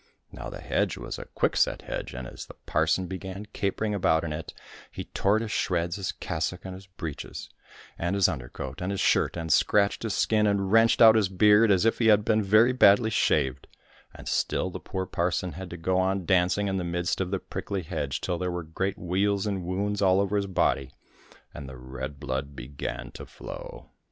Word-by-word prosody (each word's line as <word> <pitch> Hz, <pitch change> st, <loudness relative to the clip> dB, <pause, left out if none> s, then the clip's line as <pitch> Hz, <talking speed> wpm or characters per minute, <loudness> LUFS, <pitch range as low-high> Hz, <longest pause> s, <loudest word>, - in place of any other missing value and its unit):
Now -, -, -7 dB
the -, -, -9 dB
hedge -, -, 0 dB
was -, -, -6 dB
a -, -, -7 dB
quickset -, -, 0 dB
hedge, -, -, -5 dB
and 65 Hz, -1 st, -6 dB
as -, -, -9 dB
the -, -, -12 dB
parson 95 Hz, -, +1 dB
began 95 Hz, +2 st, -6 dB
capering 105 Hz, +2 st, -1 dB
about 90 Hz, -5 st, +2 dB
in 80 Hz, -2 st, -3 dB
it, 75 Hz, +1 st, -6 dB, 0.4 s
he -, -, -6 dB
tore 100 Hz, +2 st, +1 dB
to 115 Hz, 0 st, -2 dB
shreds 85 Hz, -3 st, -1 dB
his 95 Hz, -2 st, -2 dB
cassock 85 Hz, +3 st, -4 dB
and 95 Hz, -, -6 dB
his 95 Hz, +1 st, -11 dB
breeches, 80 Hz, -6 st, -7 dB, 0.5 s
and 85 Hz, +3 st, -1 dB
his 100 Hz, -2 st, +4 dB
under 65 Hz, -9 st, -4 dB
coat, 70 Hz, +4 st, -7 dB
and 90 Hz, -, -2 dB
his 100 Hz, -1 st, -2 dB
shirt, -, -, +2 dB
and 80 Hz, -2 st, 0 dB
scratched 100 Hz, -1 st, +3 dB
his 110 Hz, -3 st, -2 dB
skin 105 Hz, -1 st, +2 dB
and 100 Hz, -2 st, 0 dB
wrenched 115 Hz, +1 st, +5 dB
out 110 Hz, -1 st, +9 dB
his 110 Hz, -4 st, +2 dB
beard 105 Hz, +3 st, +5 dB
as 95 Hz, +1 st, +3 dB
if 115 Hz, -, +2 dB
he 115 Hz, -, +3 dB
had 105 Hz, -1 st, +5 dB
been 110 Hz, -1 st, +3 dB
very 110 Hz, +5 st, +4 dB
badly 110 Hz, -2 st, +5 dB
shaved, 70 Hz, -, +1 dB, 0.4 s
and -, -, -12 dB
still -, -, 0 dB
the -, -, -6 dB
poor 95 Hz, -1 st, -4 dB
parson 90 Hz, 0 st, -1 dB
had 95 Hz, +3 st, -8 dB
to 85 Hz, -, -7 dB
go 90 Hz, +3 st, 0 dB
on 95 Hz, 0 st, 0 dB
dancing 95 Hz, +2 st, +2 dB
in 95 Hz, -1 st, -1 dB
the 90 Hz, -, -2 dB
midst 85 Hz, +1 st, -1 dB
of 95 Hz, -, -2 dB
the 95 Hz, -, 0 dB
prickly 95 Hz, 0 st, -5 dB
hedge 75 Hz, -4 st, -3 dB
till 90 Hz, -2 st, -2 dB
there 90 Hz, -, -1 dB
were 90 Hz, -1 st, -3 dB
great 95 Hz, +5 st, -3 dB
weals 95 Hz, +3 st, 0 dB
and 100 Hz, -3 st, -2 dB
wounds 100 Hz, +3 st, -2 dB
all 95 Hz, -1 st, +4 dB
over 100 Hz, +1 st, 0 dB
his 100 Hz, -1 st, 0 dB
body, 70 Hz, -8 st, 0 dB, 0.6 s
and 70 Hz, -2 st, -8 dB
the 65 Hz, -, -9 dB
red 65 Hz, +2 st, -7 dB
blood 70 Hz, 0 st, -4 dB
began 65 Hz, +1 st, -6 dB
to -, -, -9 dB
flow. -, -, -10 dB
95 Hz, 210 wpm, -27 LUFS, 80-100 Hz, 0.6 s, out